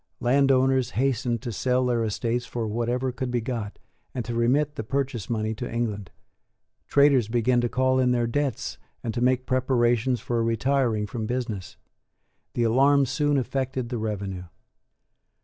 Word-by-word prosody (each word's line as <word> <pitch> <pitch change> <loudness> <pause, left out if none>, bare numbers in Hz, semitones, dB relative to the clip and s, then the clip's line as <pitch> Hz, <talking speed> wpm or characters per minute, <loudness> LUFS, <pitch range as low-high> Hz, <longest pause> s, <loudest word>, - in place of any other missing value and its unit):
Landowners 130 0 +3
hastened 125 -3 0
to 120 - -3
sell 125 +4 +1
their 120 -2 +1
estates 115 +3 -2
for 115 -2 -3
whatever 120 +4 -1
could 130 0 -4
be 120 0 0
got, 115 -3 -4 0.4
and 125 - -3
to 120 - -4
remit 135 +6 +2
the 145 - -5
purchase 130 -3 -2
money 110 -1 -1
to 110 - -6
England. 105 -5 -2 0.8
Traders 140 -5 +4
began 120 +2 +2
to 120 - 0
call 130 +1 +2
in 125 -1 +3
their 120 -1 +2
debts 140 +3 -2 0.2
and 115 - -2
to 120 - -2
make 130 0 +2
preparations 125 -1 +1
for 120 -1 -1
retiring 115 -1 +1
from 110 +1 -4
business. 115 -7 -4 0.8
The 120 - +1
alarm 135 +5 +4
soon 145 +2 +1
affected 130 -1 -2
the 120 -2 -3
revenue. 100 -4 -4
120 Hz, 155 wpm, -25 LUFS, 115-130 Hz, 0.8 s, Traders